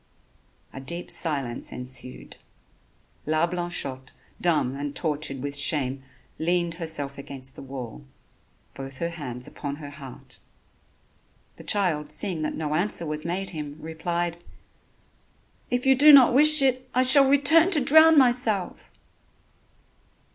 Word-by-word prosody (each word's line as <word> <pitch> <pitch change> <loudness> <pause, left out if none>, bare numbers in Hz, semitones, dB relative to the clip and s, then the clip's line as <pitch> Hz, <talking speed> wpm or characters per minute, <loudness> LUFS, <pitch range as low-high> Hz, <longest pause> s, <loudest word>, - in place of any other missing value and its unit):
A - - -8
deep 170 +6 -6
silence 140 -7 0
ensued. 125 0 -5 0.9
La 155 +2 +1
Blanchotte, 175 -7 -2 0.3
dumb 155 -7 0
and 145 0 -6
tortured 150 -4 -4
with 145 0 -4
shame, 140 -2 +1 0.4
leaned 170 +1 -1
herself 145 -4 -3
against 135 -1 -8
the - - -11
wall, 130 -1 -9 0.7
both 135 0 -9
her 170 +3 -3
hands 125 -7 -8
upon 140 -1 -7
her 145 -1 -10
heart. 140 -3 -13 1.2
The - - -12
child 165 -8 0
seeing 185 -6 -3
that 155 - -3
no 150 -1 -4
answer 170 +1 -1
was 150 0 -4
made 185 +3 -4
him, 150 -3 -7
replied: 170 +2 -4 1.3
"If 245 +1 -2
you 265 - +5
do 290 +4 +6
not 270 -4 +7
wish 305 +2 +6
it, 255 -1 0
I 255 - +3
shall 265 +1 +6
return 290 +5 +5
to 330 - +2
drown 315 +3 +5
myself." 240 -7 +1
160 Hz, 130 wpm, -24 LUFS, 140-220 Hz, 1.3 s, not